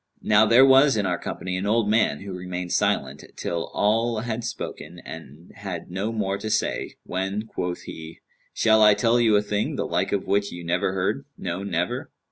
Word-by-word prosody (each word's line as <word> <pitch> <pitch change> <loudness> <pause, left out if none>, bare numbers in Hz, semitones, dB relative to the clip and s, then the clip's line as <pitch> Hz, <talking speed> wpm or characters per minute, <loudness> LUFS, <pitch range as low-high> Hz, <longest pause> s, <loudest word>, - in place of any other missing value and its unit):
Now 105 +1 +5
there 120 +4 +7
was 135 -1 +6
in 105 - 0
our 90 -2 -1
company 90 0 -4
an 95 +2 -2
old 110 0 +2
man, 105 -9 +2
who 95 -1 -7
remained 90 -1 -5
silent, - - 0
till 85 -1 -3
all 115 +2 +1
had 115 0 -3
spoken 90 -7 -6
and 80 +1 -11
had 95 -4 -7
no 100 +5 -2
more 100 -3 -2
to 110 - -4
say, - - -1
when 95 +3 -3
quoth 90 -5 -4
he, 80 0 -9 0.3
'Shall 110 -1 +3
I 105 -1 +7
tell 120 +1 +2
you 115 -3 +4
a 105 - +3
thing, 105 0 -1
the - - -2
like - - -1
of 100 - -1
which 100 0 0
you 85 0 -8
never 85 +2 0
heard; 100 +9 -1
no, 90 +1 -4
never?' 90 -3 -2
100 Hz, 195 wpm, -24 LUFS, 90-110 Hz, 0.3 s, there